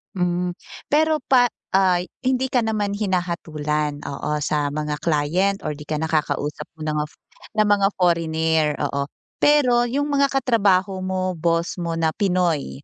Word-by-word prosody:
Hmm, 180 0 0 0.4
pero 310 -1 +3
pa 250 -2 +4 0.2
ay, 185 -2 +2 0.2
hindi 260 0 +1
ka 250 - +3
naman 215 -3 -1
hinahatulan, 155 -7 -2
oo, 150 +1 -3
sa 150 0 0
mga 150 0 -3
client 170 +6 0
or 155 - -2
di 150 0 -9
kaya 155 +1 -2
nakakausap 150 -2 -1
mo 155 - -8
na 155 - -1
ng 150 - -1
of - - -24 0.4
ng 215 - +4
mga 200 -1 +3
foreigner, 160 -3 +1
oo. 140 0 -1 0.3
Pero 250 -5 +4
yung 285 +4 -1
mga 280 0 +3
katrabaho 200 -8 +2
mo, 185 0 -1
boss 170 +1 -1
mo 170 -1 -2
na 165 -1 +1
Pinoy, 180 -7 0
180 Hz, 155 wpm, -22 LUFS, 155-205 Hz, 0.4 s, pa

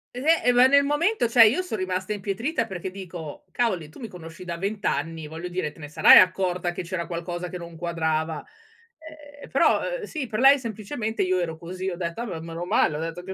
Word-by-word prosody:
Eh, 250 - -5 0.2
e 245 - +4
ma 245 +1 +6
nel 280 +1 +5
momento, 295 - +1
sai, 230 -2 +7
io 365 - 0
son 360 -12 -4
rimasta 185 +2 -2
impietrita 225 - -2
perché 190 -2 -6
dico: 180 -5 -9
“Cavoli, 185 -11 -1
tu - - -15
mi 230 - -6
conosci 175 -1 -11
da 170 -2 -5
20 200 +3 -4
anni, 160 0 -2
voglio 165 +3 -7
dire, 175 -4 -3
te - - -22
ne 145 - -7
sarai 150 - +7
accorta 185 -1 +3
che 175 - -5
c'era 170 -1 -4
qualcosa 175 +1 -5
che 180 - -6
non 170 -1 -10
quadrava.” 160 -2 -2 1.0
Eh - - -10
però, - - +3 0.2
uhm, - - -8
sì, 310 -8 -4
per 215 +1 -3
lei 275 +2 +7
semplicemente 220 -1 -4
io 185 0 +1
ero 165 -2 -3
così. 185 +2 -5
Ho 175 - -4
detto: 170 +5 -4
“Ah - - -3
beh, 175 -8 -5
meno 165 +1 -6
male, 155 -3 +2
ho - - -5
detto 165 +2 -5
che, 190 +1 -6
185 Hz, 225 wpm, -25 LUFS, 170-225 Hz, 1.0 s, sai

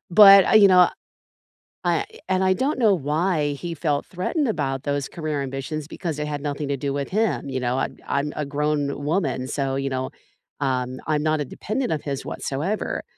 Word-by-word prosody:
but, 195 0 +9
uh, - - +2
you 210 -2 +8
know, 180 -1 +7 1.0
I 170 -2 +1 0.2
and 190 0 +1
I 190 0 +4
don't 265 +7 0
know 220 -4 +5
why 155 -1 0
he 170 +4 -5
felt 145 -2 -1
threatened 240 - -1
about 135 -9 -1
those 145 -1 -1
career 155 -3 -3
ambitions, 135 +3 -4
because 160 0 -4
they 150 - -3
had 145 -1 -3
nothing 145 0 -3
to 140 - -1
do 140 +1 -2
with 140 0 -3
him, 215 -7 0
you 130 -1 -2
know, 125 +1 0
I'm - - -2
I'm 140 +1 -1
a 150 - -2
grown 145 0 -1
woman, 145 -5 0
so, 135 -1 -2
you 135 0 -1
know, 130 -1 -3 0.5
um, 130 -2 -1
I'm 150 -1 +1
not 155 0 +1
a - - -1
dependent 225 - -3
of 150 - -2
his 140 -2 -4
whatsoever, 165 +11 -3
150 Hz, 195 wpm, -23 LUFS, 140-180 Hz, 1.0 s, but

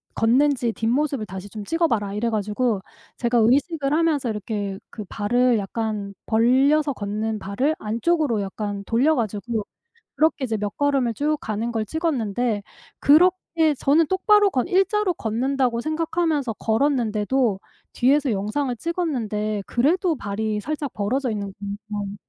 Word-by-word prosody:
걷는지 245 0 +2
뒷모습을 255 +1 0
다시 190 +1 -8
좀 210 -1 -7
찍어 330 +8 +1
봐라." 205 -5 -1
이래 230 +3 -1
가지고 215 0 0 0.4
제가 240 0 +1
의식을 280 +5 +2
하면서 310 -6 +1
이렇게 205 -2 -3
그 215 - -7
발을 240 +3 +2
약간 205 0 -3
벌려서 270 +6 +3
걷는 215 +1 -3
발을 255 +11 -1
안쪽으로 235 +1 0
약간 200 0 -4
돌려 270 +7 +3
가지고 220 -1 -2 0.5
그렇게 310 -3 +2
이제 225 -3 -1
몇 205 0 -4
걸음을 275 -5 +1
쭉 300 +4 0
가는 220 +2 -3
걸 220 -1 -1
찍었는데 245 - -1 0.4
그렇게 325 0 +4
저는 310 +3 +3
똑바로 410 +2 +4
걷 255 -2 0
1 380 0 +4
자로 420 -2 +1
걷는다고 245 +1 0
생각하면서 310 -4 -1
걸었는데도 225 -3 +1 0.3
뒤에서 275 +1 +2
영상을 230 +7 -1
찍었는데 220 - -2
그래도 325 +6 +1
발이 210 0 -2
살짝 295 +2 -4
벌어져 245 +5 -1
있는 200 -2 -4 0.4
거예요. 205 -1 -4
240 Hz, 325 characters per minute, -23 LUFS, 210-295 Hz, 0.5 s, 그렇게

